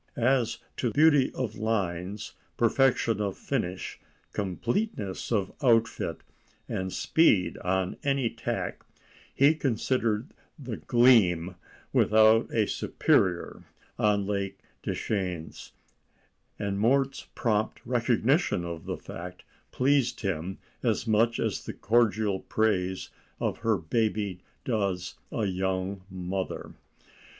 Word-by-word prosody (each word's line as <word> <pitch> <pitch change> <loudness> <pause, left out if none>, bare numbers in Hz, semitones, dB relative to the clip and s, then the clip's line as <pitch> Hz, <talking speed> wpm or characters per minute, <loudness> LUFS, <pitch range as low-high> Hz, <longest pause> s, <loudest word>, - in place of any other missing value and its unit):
As 120 -1 +2 0.2
to 125 - 0
beauty 145 -2 +5
of 115 -4 -3
lines, 100 -3 -2 0.2
perfection 120 -2 +3
of 100 -2 -2
finish, 90 +1 -3 0.3
completeness 105 - -2
of 100 -4 +1
outfit, 115 -3 +2 0.5
and 95 0 -3
speed 110 - +3
on 95 0 -1
any 140 -3 +1
tack, - - -4 0.5
he 140 +3 +5
considered 125 -4 0 0.3
the 125 -7 -6
Gleam 100 -8 +4 0.4
without 110 +1 +5
a 110 -2 +2
superior 90 -2 +1 0.4
on 105 -2 +2
Lake 100 -1 -2 0.2
Deschenes, 90 -6 -3 0.9
and 100 -1 -2
Mort's 135 +5 +1
prompt 110 -2 0
recognition 120 - +1
of 85 -2 -6
the - - -3
fact 90 +1 -9 0.3
pleased 135 -1 +1
him 95 -2 -2 0.2
as - - 0
much 115 +2 +2
as - - -1
the - - -6
cordial 110 -3 +2
praise 95 -4 0 0.3
of - - -1
her 115 -2 +2
baby 100 +2 -1 0.3
does 100 -6 -1 0.2
a 110 - -1
young 95 0 -2
mother. 95 0 -4
105 Hz, 105 wpm, -28 LUFS, 95-120 Hz, 0.9 s, beauty